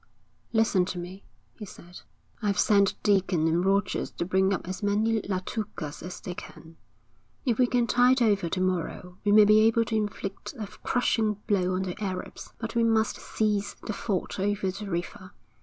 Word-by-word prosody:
'Listen 220 Hz, -5 st, +3 dB
to 180 Hz, 0 st, -4 dB
me,' 180 Hz, +3 st, -7 dB, 0.3 s
he 220 Hz, -, -10 dB
said. 180 Hz, -3 st, -11 dB, 0.4 s
'I've 205 Hz, -2 st, 0 dB
sent 200 Hz, -2 st, +4 dB
Deacon 190 Hz, -5 st, +2 dB
and 170 Hz, +2 st, +2 dB
Rogers 195 Hz, 0 st, +1 dB
to -, -, -4 dB
bring 190 Hz, +2 st, +2 dB
up 190 Hz, -, -2 dB
as 185 Hz, +2 st, -5 dB
many 215 Hz, +2 st, +1 dB
Latukas 185 Hz, -5 st, -4 dB
as 180 Hz, +1 st, -7 dB
they 180 Hz, -, -6 dB
can. 165 Hz, -2 st, -12 dB, 0.7 s
If 240 Hz, -2 st, +1 dB
we 250 Hz, -, +5 dB
can 245 Hz, -1 st, +2 dB
tide 250 Hz, +2 st, +4 dB
over 205 Hz, -7 st, +2 dB
to 185 Hz, -, -2 dB
morrow 180 Hz, 0 st, -2 dB
we 205 Hz, -, +2 dB
may 210 Hz, 0 st, +8 dB
be 215 Hz, +1 st, +6 dB
able 225 Hz, +1 st, +4 dB
to 225 Hz, -, -2 dB
inflict 205 Hz, +2 st, -4 dB
a 215 Hz, -, -4 dB, 0.2 s
crushing 225 Hz, -3 st, +1 dB
blow 185 Hz, -3 st, +1 dB
on 190 Hz, -, -1 dB
the 185 Hz, +3 st, -5 dB
Arabs; 185 Hz, -2 st, -5 dB
but 225 Hz, -1 st, -5 dB
we 235 Hz, -, +2 dB
must 225 Hz, -1 st, +2 dB
seize 210 Hz, -2 st, -1 dB
the 215 Hz, -, -2 dB
ford 200 Hz, -3 st, -3 dB
over 195 Hz, -1 st, 0 dB
the 200 Hz, +2 st, -7 dB
river. 175 Hz, +1 st, -5 dB
200 Hz, 180 wpm, -27 LUFS, 185-220 Hz, 0.7 s, may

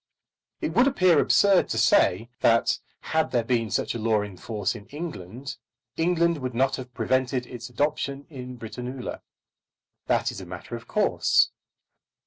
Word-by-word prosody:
It 160 Hz, -, -2 dB
would 245 Hz, +8 st, +5 dB
appear 185 Hz, -, +4 dB
absurd 200 Hz, +4 st, +4 dB
to -, -, -1 dB
say 110 Hz, +7 st, +3 dB
that 115 Hz, 0 st, +3 dB, 0.2 s
had 160 Hz, 0 st, 0 dB
there 120 Hz, -2 st, +1 dB
been 115 Hz, -2 st, 0 dB
such -, -, -1 dB
a 115 Hz, -, -4 dB
law 110 Hz, -1 st, +2 dB
in 100 Hz, -2 st, -8 dB
force 105 Hz, +1 st, -2 dB
in 110 Hz, -3 st, -11 dB
England, 140 Hz, -, -7 dB, 0.4 s
England 170 Hz, -1 st, +2 dB
would 130 Hz, -2 st, -4 dB
not 135 Hz, +2 st, +2 dB
have 130 Hz, -1 st, -8 dB
prevented 130 Hz, -1 st, 0 dB
its 120 Hz, 0 st, -8 dB
adoption 140 Hz, +1 st, -1 dB
in 125 Hz, -4 st, -8 dB
Britannula. 125 Hz, +3 st, -6 dB, 0.9 s
That -, -, +2 dB
is -, -, -8 dB
a -, -, -8 dB
matter -, -, -7 dB
of -, -, -9 dB
course. -, -, +3 dB
125 Hz, 155 wpm, -26 LUFS, 115-150 Hz, 0.9 s, would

